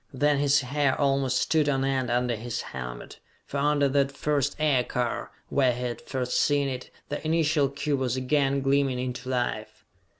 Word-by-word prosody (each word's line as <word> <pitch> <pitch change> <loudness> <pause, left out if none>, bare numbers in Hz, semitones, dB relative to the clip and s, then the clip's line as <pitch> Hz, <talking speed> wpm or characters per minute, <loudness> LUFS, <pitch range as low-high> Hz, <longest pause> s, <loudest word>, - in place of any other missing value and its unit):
Then 145 +1 +2
his 140 0 +3
hair 140 +1 0
almost 135 -2 +2
stood 155 -2 +2
on 135 -1 +1
end 130 -2 0
under 120 0 +1
his 115 +2 -4
helmet, - - -7 0.3
for 145 - -5
under 145 0 +3
that 140 0 +2
first 145 0 0
aircar, 125 -5 0 0.2
where 130 -3 +3
he 125 - -6
had 120 -2 -4
first 125 -2 -2
seen 145 -1 +2
it, 130 -1 -5 0.2
the 145 - -4
initial 155 -3 +2
cube 140 0 -2
was 130 -2 0
again 135 +1 +1
gleaming 135 -1 +2
into 125 0 -4
life! 125 -1 -3
135 Hz, 170 wpm, -27 LUFS, 125-145 Hz, 0.3 s, his